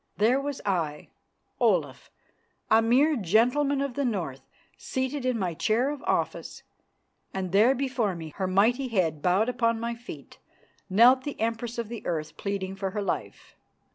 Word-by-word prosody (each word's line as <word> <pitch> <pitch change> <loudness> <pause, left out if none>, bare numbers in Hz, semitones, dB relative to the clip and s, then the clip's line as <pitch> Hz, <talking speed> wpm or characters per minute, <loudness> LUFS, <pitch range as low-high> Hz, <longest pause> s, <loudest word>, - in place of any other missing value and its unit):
There 240 +6 +3
was 285 -1 -4
I, 165 -7 -2 0.5
Olaf, - - +1 0.6
a 220 +1 +6
mere 265 +7 +3
gentleman 250 - +2
of 280 -2 -2
the 280 - -1
North, 175 - -2 0.3
seated 260 0 -3
in 250 -2 +1
my 185 -5 -1
chair 230 - +1
of 295 -2 -6
office, - - -2 0.7
and 185 -2 -3
there 220 +7 +5
before 250 -7 -1
me, 160 -2 -7
her 190 - -1
mighty 225 +8 +2
head 175 -10 0
bowed 185 +7 +2
upon 230 -2 +1
my 235 +1 -2
feet, 235 +1 -11 0.5
knelt 245 +7 +6
the 290 - -6
Empress 230 +1 -2
of 235 -2 -3
the 230 0 -7
Earth 155 -3 -3
pleading 195 -1 -4
for 195 0 -3
her 210 +2 -3
life. - - -5
225 Hz, 160 wpm, -27 LUFS, 190-255 Hz, 0.7 s, a